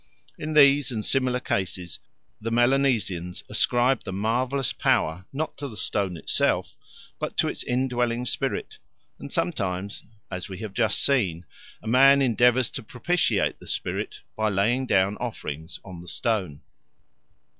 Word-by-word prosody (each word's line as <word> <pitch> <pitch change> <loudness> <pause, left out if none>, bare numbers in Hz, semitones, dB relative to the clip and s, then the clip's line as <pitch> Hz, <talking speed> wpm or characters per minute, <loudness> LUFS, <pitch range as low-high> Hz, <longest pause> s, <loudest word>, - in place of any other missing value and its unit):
In 155 +1 -5
these 140 -3 +6
and 110 -3 -2
similar 130 -2 +2
cases 90 -6 -3 0.4
the 115 - -2
Melanesians 120 -8 +1
ascribe 125 +2 +3
the - - -6
marvellous 120 +7 0
power, 80 +4 +1
not 155 +3 -3
to 140 - -4
the 110 -5 -9
stone 95 -2 -1
itself, - - +1 0.4
but - - -4
to - - +3
its - - -3
indwelling 125 -1 0
spirit; - - -3 0.4
and - - -8
sometimes, 90 +3 -2 0.3
as 90 +2 -5
we 95 - -7
have 105 0 -6
just 110 -3 +2
seen, 95 - +1 0.4
a - - -8
man 135 +4 +6
endeavours 125 -1 +3
to 135 - -4
propitiate 160 +10 0
the - - -14
spirit - - -3
by 110 0 +1
laying 115 +7 +1
down 100 -1 +2
offerings 85 -8 -6
on 90 -3 -9
the 90 - -13
stone. 95 -12 -1
115 Hz, 145 wpm, -25 LUFS, 95-130 Hz, 0.4 s, these